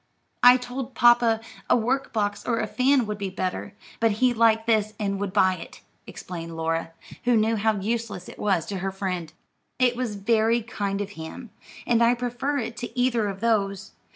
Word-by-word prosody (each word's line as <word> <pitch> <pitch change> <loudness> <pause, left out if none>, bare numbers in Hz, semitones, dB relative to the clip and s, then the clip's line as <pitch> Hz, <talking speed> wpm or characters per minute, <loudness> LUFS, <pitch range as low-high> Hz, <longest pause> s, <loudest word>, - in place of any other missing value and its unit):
"I 245 +1 +8
told 250 +1 -6
papa 240 -2 +5 0.3
a - - +5
work 255 +4 -1
box 205 -2 -1
or 230 -2 0
a - - 0
fan 255 +3 +2
would 210 -1 -5
be 200 -1 -2
better; 185 +2 -4 0.2
but 225 -2 +3
he 245 +4 +2
liked 225 -1 +3
this 215 -2 +1
and 200 -2 -1
would 200 -1 -2
buy 185 -2 +3
it," - - -11 0.3
explained 165 -2 -7
Laura, 165 0 -1 0.4
who 245 -1 +4
knew 220 +1 +2
how 220 +1 +1
useless 220 -2 -3
it - - -11
was 190 -6 +1
to 195 -2 -4
her 195 +1 -2
friend. 185 -4 -4 0.5
"It 250 -1 +3
was 240 -4 -3
very 225 +3 +2
kind 200 -3 -3
of 200 0 -5
him, 205 +7 -9 0.3
and 235 -1 +2
I 235 +1 +4
prefer 250 +4 -2
it 230 -3 -4
to 240 +2 -6
either 240 -4 +2
of 195 -1 -5
those. 200 -4 0
220 Hz, 190 wpm, -25 LUFS, 195-240 Hz, 0.5 s, I